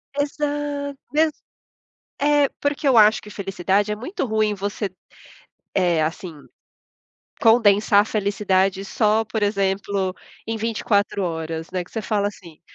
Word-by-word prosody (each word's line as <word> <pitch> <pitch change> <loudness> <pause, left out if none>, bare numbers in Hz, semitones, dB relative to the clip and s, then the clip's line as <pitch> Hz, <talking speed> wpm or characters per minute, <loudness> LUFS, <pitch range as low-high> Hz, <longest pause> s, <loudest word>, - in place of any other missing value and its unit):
Exa 290 -1 -2 0.2
Mesmo 310 0 +3 0.9
É. 290 0 +4
Porque 285 0 -1
eu 255 - +5
acho 215 0 +6
que 210 - -12
felicidade 195 +1 -1
é 210 - -1
muito 265 - -4
ruim 215 -1 +1
você, 200 0 -3 0.8
eh, 170 -3 +2
assim, 165 +2 -3 1.1
condensar 210 -3 +5
a - - -2
felicidade 195 -2 0
só, 215 +1 +1
por 220 -1 -2
exemplo, 195 -1 0 0.3
em 225 - -2
24 215 -2 0
horas, 160 -1 -4
né? 180 -1 -2
Que - - -22
você 225 - -3
fala 205 -2 0
assim 170 -6 -15
210 Hz, 130 wpm, -22 LUFS, 195-230 Hz, 1.1 s, acho